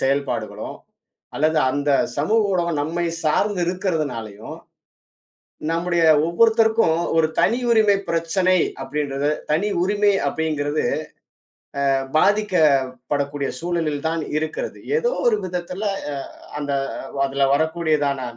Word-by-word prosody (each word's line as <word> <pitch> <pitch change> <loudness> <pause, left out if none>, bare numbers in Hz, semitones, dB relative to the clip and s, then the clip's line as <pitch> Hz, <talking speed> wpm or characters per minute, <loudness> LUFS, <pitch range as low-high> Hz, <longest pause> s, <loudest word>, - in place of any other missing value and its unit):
செயல்பாடுகளும், 130 -6 -2 0.6
அல்லது 155 +2 +2
அந்தச் 145 0 +1
சமூக 215 +10 +2
ஊடகம் 170 -4 0
நம்மைச் 165 +1 -2
சார்ந்து 195 +5 +1
இருக்கறதுனாலயும், 150 - -3 1.1
நம்முடைய 170 0 +1 0.2
ஒவ்வொருத்தருக்கும் 220 -2 +3 0.2
ஒரு 160 - +4
தனி 235 - +2
உரிமை 215 -3 +4
பிரச்சனை 175 +3 +2 0.3
அப்டின்றது, 140 +1 -2 0.2
தனி 175 +7 +1 0.2
உரிமை 205 +1 +2
அப்டிங்கிறது 150 -1 -1 1.1
அ... - - +3 0.2
பாதிக்கப்படக்கூடிய 145 -8 +1
சூழலில் 165 -4 -2
தான் 165 -1 -2
இருக்கிறது. 160 - -4 0.2
ஏதோ 480 +1 0 0.2
ஒரு 215 -3 +3
விதத்துல 180 +2 -4 0.5
அ - - -18 0.2
அந்த 145 -1 -3 0.6
அதுல 140 0 +1
வரக்கூடியதான 155 -3 0
160 Hz, 100 wpm, -22 LUFS, 145-185 Hz, 1.1 s, ஒரு